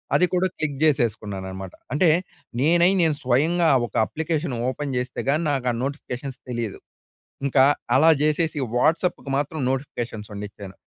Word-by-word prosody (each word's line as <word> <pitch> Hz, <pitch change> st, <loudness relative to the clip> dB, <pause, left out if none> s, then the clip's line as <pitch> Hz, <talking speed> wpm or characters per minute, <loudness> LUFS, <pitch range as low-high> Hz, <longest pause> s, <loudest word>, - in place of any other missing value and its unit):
అది 180 Hz, -, +5 dB
కూడా, 180 Hz, +1 st, +2 dB
క్లిక్ 145 Hz, -3 st, -2 dB
జేసేసుకున్నాననమాట. 100 Hz, -, -1 dB, 0.2 s
అంటే, 160 Hz, +4 st, +4 dB, 0.5 s
నేనై, 170 Hz, +5 st, +4 dB
నేను 160 Hz, -3 st, +2 dB
స్వయంగా 160 Hz, +7 st, +2 dB, 0.2 s
ఒక -, -, -22 dB
అప్లికేషన్ 160 Hz, +1 st, -2 dB, 0.2 s
ఓపెన్ 140 Hz, +1 st, -4 dB
చేస్తే 125 Hz, +1 st, -3 dB
గానీ, 155 Hz, +4 st, +2 dB
నాకు 135 Hz, -3 st, -1 dB
ఆ -, -, -3 dB
నోటిఫికేషన్స్ 135 Hz, -1 st, -5 dB
తెలీదు. 115 Hz, -4 st, -3 dB, 0.7 s
ఇంకా 135 Hz, -1 st, +5 dB, 0.3 s
అలా 155 Hz, +5 st, +6 dB
జేసేసీ 155 Hz, +1 st, +1 dB, 0.2 s
వాట్సప్‌కి 160 Hz, +2 st, +1 dB
మాత్రం 145 Hz, +3 st, -2 dB
నోటిఫికేషన్సున్నిచ్చాను. 105 Hz, -7 st, -5 dB
140 Hz, 125 wpm, -23 LUFS, 120-155 Hz, 0.7 s, అలా